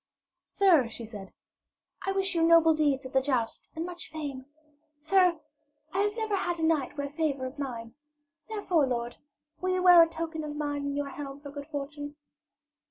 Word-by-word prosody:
'Sir,' 345 -11 +4
she 230 +1 -7
said, 205 -3 -9 0.8
'I 390 - +1
wish 385 -1 0
you 335 - +1
noble 330 -1 +6
deeds 290 -3 +1
at 260 - -8
the 265 - +4
jousts 255 -4 -2
and 325 +1 -3
much 350 -1 -8
fame. 280 -4 -6 0.5
Sir, 355 +1 +3 0.5
I 380 - 0
have 415 +2 +1
never 440 -2 0
had 350 -2 -1
a 325 - -3
knight 310 -4 +1
wear 280 0 -3
favour 290 -4 -1
of 260 +3 -7
mine. 230 -5 -5 0.6
Therefore, 365 -9 +1
lord, 240 -1 -3 0.4
will 370 - -1
you 365 - 0
wear 355 -2 +9
a 330 - +5
token 325 -1 -4
of 300 -1 -5
mine 290 -1 -2
in 280 0 -2
your 285 -1 -2
helm 275 0 -7
for 285 -1 -9
good 285 0 -8
fortune?' 290 -1 -6
295 Hz, 185 wpm, -29 LUFS, 275-335 Hz, 0.8 s, wear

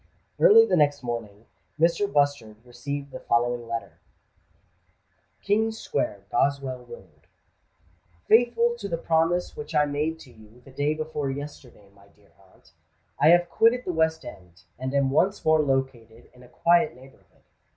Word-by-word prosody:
Early 455 -2 +7
the - - +1
next 145 -2 +1
morning, 115 -3 -6 0.3
Mrs. 170 +5 +1
Bustard 140 - 0
received 140 +3 -6
the - - -8
following 120 0 -1
letter:— 115 0 -6 1.4
"King 220 +2 +1
Square, 105 - -3
Goswell 135 -3 -1
Road. 120 - -15 1.0
"Faithful 235 +1 +3
to 200 - -5
the 170 - -3
promise 165 +2 0
which 150 +2 -8
I 150 0 +4
made 150 +3 -2
to 130 - -15
you 110 +2 -19
the 135 - -14
day 145 +3 -1
before 155 -2 -4
yesterday, 135 -7 -9
my 100 0 -22
dear 100 0 -28 0.2
aunt, - - -26 0.5
I 145 - +4
have 175 +1 +5
quitted 240 +6 +2
the 180 - -3
West 160 0 0
End, 90 -4 -13 0.2
and 130 0 -4
am 140 -1 +2
once 190 +8 +1
more 155 0 +4
located 130 -5 -3
in 125 - -19
a 125 - -16
quiet 170 +4 +2
neighbourhood. 130 +1 -20
140 Hz, 150 wpm, -25 LUFS, 120-165 Hz, 1.4 s, Early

